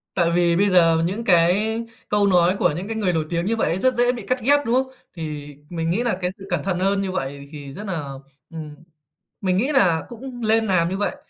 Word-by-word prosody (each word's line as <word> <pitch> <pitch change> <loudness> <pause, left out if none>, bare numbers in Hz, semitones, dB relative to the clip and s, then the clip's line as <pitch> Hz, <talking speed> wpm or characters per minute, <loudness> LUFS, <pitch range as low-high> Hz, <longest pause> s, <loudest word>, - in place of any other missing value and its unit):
Tại 170 -2 +2
vì 170 0 +3
bây 200 +3 +3
giờ 165 -3 +5
mà 165 - +1
những 195 +7 -2
cái 200 +5 +3 0.3
câu 205 -1 +3
nói 180 -1 +4
của 175 - +3
những 185 +5 -5
cái 225 - -3
người 195 -5 +1
nổi 160 -2 0
tiếng 170 +1 -1
như 225 - +1
vậy 225 - 0
ấy 175 - -1
rất 260 +5 +3
dễ 245 0 +3
bị 235 -5 -7
cắt 255 0 +1
ghép, 285 +5 +4
đúng 230 - +1
không? 260 0 0 0.2
Thì 150 -3 -6
mình 165 -1 -2
nghĩ 220 +8 0
là 230 -6 0
cái 180 0 -1
sự 195 - -11
cẩn - - -1
thận 185 -2 -1
hơn 195 +1 +1
như 190 - -2
vậy 140 -4 -4
thì 145 -2 -9
rất 205 - -7
nà 180 -7 -3 0.5
ừm, 155 -2 -8 0.7
mình 185 -1 +1
nghĩ 260 +9 +1
nà 175 -10 +3
cũng 245 +1 -9
lên 220 0 +3
làm 170 -3 +2
như 190 - -3
vậy. 205 - -1
185 Hz, 255 wpm, -22 LUFS, 170-220 Hz, 0.7 s, giờ